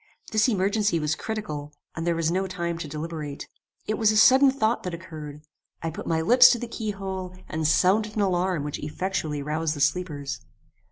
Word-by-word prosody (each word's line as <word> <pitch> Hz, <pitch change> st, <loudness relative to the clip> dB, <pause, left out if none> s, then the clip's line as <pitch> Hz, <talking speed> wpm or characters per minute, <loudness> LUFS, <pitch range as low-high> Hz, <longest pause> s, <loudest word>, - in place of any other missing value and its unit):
This 220 Hz, +1 st, +3 dB
emergency 205 Hz, -3 st, +1 dB
was 150 Hz, 0 st, 0 dB
critical, 150 Hz, -7 st, -5 dB, 0.2 s
and 165 Hz, +1 st, -3 dB
there 170 Hz, -, +2 dB
was 165 Hz, 0 st, 0 dB
no 190 Hz, +2 st, 0 dB
time 170 Hz, -2 st, -3 dB
to 160 Hz, -, -5 dB
deliberate. 150 Hz, -1 st, -6 dB, 0.4 s
It 215 Hz, -, -2 dB
was 220 Hz, -1 st, +4 dB
a 215 Hz, -, +1 dB
sudden 265 Hz, +5 st, +7 dB
thought 240 Hz, -4 st, +1 dB
that 180 Hz, -2 st, -4 dB
occurred. 155 Hz, -4 st, -9 dB, 0.4 s
I 165 Hz, -, -2 dB
put -, -, -7 dB
my 160 Hz, -1 st, +1 dB
lips 245 Hz, +9 st, +8 dB
to -, -, -1 dB
the 240 Hz, -, -5 dB
key 225 Hz, -2 st, -4 dB
hole, 190 Hz, -2 st, -5 dB
and 155 Hz, -1 st, -1 dB
sounded 200 Hz, +7 st, +3 dB
an 215 Hz, -, +1 dB
alarm 180 Hz, -4 st, 0 dB
which 145 Hz, 0 st, -4 dB
effectually 155 Hz, -2 st, -3 dB
roused 155 Hz, +1 st, -1 dB
the -, -, -7 dB
sleepers. 145 Hz, -2 st, -1 dB
175 Hz, 190 wpm, -25 LUFS, 155-210 Hz, 0.4 s, lips